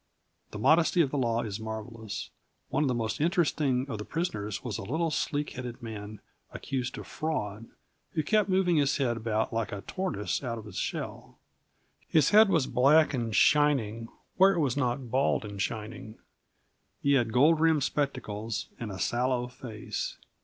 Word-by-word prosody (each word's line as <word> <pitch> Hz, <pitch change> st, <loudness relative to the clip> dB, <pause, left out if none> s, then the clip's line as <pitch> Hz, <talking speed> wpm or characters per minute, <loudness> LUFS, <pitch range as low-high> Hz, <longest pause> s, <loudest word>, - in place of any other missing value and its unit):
The -, -, -7 dB
modesty 160 Hz, -, +4 dB
of 140 Hz, -5 st, +1 dB
the 145 Hz, -, -1 dB
law 115 Hz, -2 st, +1 dB
is 105 Hz, -1 st, -4 dB
marvellous. 110 Hz, 0 st, -6 dB, 0.4 s
One -, -, +1 dB
of -, -, +2 dB
the 125 Hz, -, +1 dB
most 110 Hz, +2 st, -2 dB
interesting 150 Hz, -6 st, +1 dB
of 115 Hz, -6 st, -5 dB
the -, -, -4 dB
prisoners 110 Hz, -, -3 dB
was 115 Hz, -6 st, -3 dB
a -, -, -5 dB
little 160 Hz, +10 st, -1 dB
sleek 145 Hz, -1 st, -1 dB
headed 125 Hz, -1 st, -7 dB
man 105 Hz, -2 st, -7 dB, 0.3 s
accused 130 Hz, -2 st, -4 dB
of -, -, -7 dB
fraud, 115 Hz, -9 st, -3 dB, 0.5 s
who 155 Hz, -, 0 dB
kept 210 Hz, +5 st, +2 dB
moving 185 Hz, -3 st, +3 dB
his 145 Hz, -1 st, +2 dB
head 125 Hz, -5 st, +1 dB
about 110 Hz, 0 st, -1 dB
like 115 Hz, -1 st, -1 dB
a 100 Hz, -, -5 dB
tortoise's 175 Hz, -, -3 dB
out 115 Hz, -3 st, -3 dB
of 110 Hz, -, -9 dB
its 105 Hz, -, -6 dB
shell. -, -, -5 dB, 0.7 s
His 155 Hz, -4 st, +3 dB
head 215 Hz, 0 st, +7 dB
was 160 Hz, -7 st, +3 dB
black 150 Hz, +6 st, +4 dB
and 115 Hz, -4 st, -2 dB
shining 125 Hz, -7 st, +3 dB, 0.3 s
where 195 Hz, +1 st, +6 dB
it -, -, 0 dB
was 135 Hz, -5 st, +1 dB
not 125 Hz, -3 st, -1 dB
bald 130 Hz, -3 st, +2 dB
and 100 Hz, -1 st, -5 dB
shining. 110 Hz, +1 st, -5 dB, 0.8 s
He 140 Hz, -, +2 dB
had 120 Hz, -5 st, +2 dB
gold 150 Hz, +7 st, +5 dB
rimmed 160 Hz, -3 st, +3 dB
spectacles 115 Hz, -7 st, -2 dB
and 115 Hz, -3 st, -4 dB
a 95 Hz, -, -6 dB
sallow 125 Hz, +4 st, 0 dB
face. 120 Hz, -4 st, -5 dB
125 Hz, 175 wpm, -29 LUFS, 110-150 Hz, 0.8 s, head